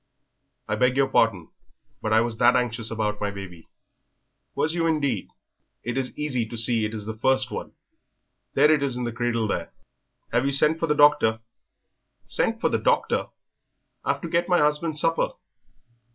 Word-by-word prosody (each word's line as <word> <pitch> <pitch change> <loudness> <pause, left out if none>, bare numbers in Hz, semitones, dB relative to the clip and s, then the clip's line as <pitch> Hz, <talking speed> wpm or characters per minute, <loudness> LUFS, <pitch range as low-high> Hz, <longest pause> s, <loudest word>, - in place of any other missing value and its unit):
"I - - 0
beg 125 +1 +2
your 135 -1 +3
pardon, 115 -10 +1 0.5
but 110 - -2
I 110 +1 +5
was 115 -1 -3
that 120 +1 +5
anxious 115 -2 -1
about 105 -2 -2
my 105 - 0
baby." 95 -4 -9 0.9
"Was 160 - 0
you 165 -1 0
indeed? 140 - -1 0.5
It 120 - -3
is 130 -1 -3
easy 140 -5 -1
to 115 +1 -7
see 115 -1 +2
it 110 +1 -4
is 105 -2 -6
the 110 - -4
first 130 +1 +1
one. - - -6 0.8
There 150 +3 +5
it 150 - +1
is 135 -3 0
in 125 - -3
the 120 - -2
cradle 115 -1 -1
there." 105 - -3 0.6
"Have 120 +3 +2
you 140 - 0
sent 150 +3 +2
for 165 - 0
the 150 - +2
doctor?" 145 -7 +4 0.8
"Sent - - 0
for - - +1
the - - 0
doctor! - - +1 0.8
I've - - -1
to - - -4
get 170 +2 0
my 180 - +4
husband's 150 +1 +1
supper." 165 +1 +1
125 Hz, 180 wpm, -25 LUFS, 110-150 Hz, 0.9 s, I